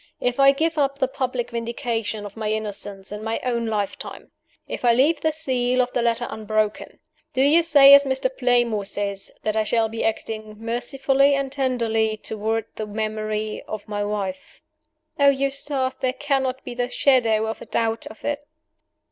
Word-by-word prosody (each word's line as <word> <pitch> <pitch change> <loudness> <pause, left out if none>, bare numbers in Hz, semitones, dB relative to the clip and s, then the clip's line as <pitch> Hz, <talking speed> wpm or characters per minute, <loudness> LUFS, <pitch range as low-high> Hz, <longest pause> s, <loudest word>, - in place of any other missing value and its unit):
If 245 +1 -1
I 275 0 +8
give 315 +3 0
up 275 -1 +1
the 265 - +1
public 255 -2 -3
vindication 230 -2 -3
of 205 - -9
my 215 -1 -2
innocence, 205 -2 -4
in 210 +1 -6
my 225 +1 -2
own 235 -2 -1
lifetime 210 -3 -4 0.4
if - - -6
I 240 -1 +5
leave 290 +5 +3
the 315 - +2
seal 255 -5 0
of 250 0 +1
the 245 - +1
letter 235 0 +1
unbroken 215 -1 -2 0.4
do 260 - +2
you 305 +5 +5
say, 285 -4 +8
as 280 0 +9
Mr. 265 - 0
Playmore 240 - +2
says, 200 -1 -2
that 215 0 -1
I 220 - +2
shall 225 +1 +1
be 225 +1 -4
acting 220 -1 -3
mercifully 270 +4 +1
and 275 -1 -2
tenderly 230 -5 0
toward 220 +1 -2
the 215 - -4
memory 215 0 -3
of 215 -1 -6
my 205 -1 -2
wife?" 200 -3 -5 0.6
"Oh, 280 0 +7
Eustace, 275 -1 0
there 255 -1 -2
cannot 265 -2 -1
be - - -6
the 245 0 -2
shadow 230 -6 +3
of 220 0 -5
a - - -9
doubt 225 0 -1
of 220 - -12
it!" 290 0 -3
235 Hz, 175 wpm, -23 LUFS, 215-270 Hz, 0.6 s, as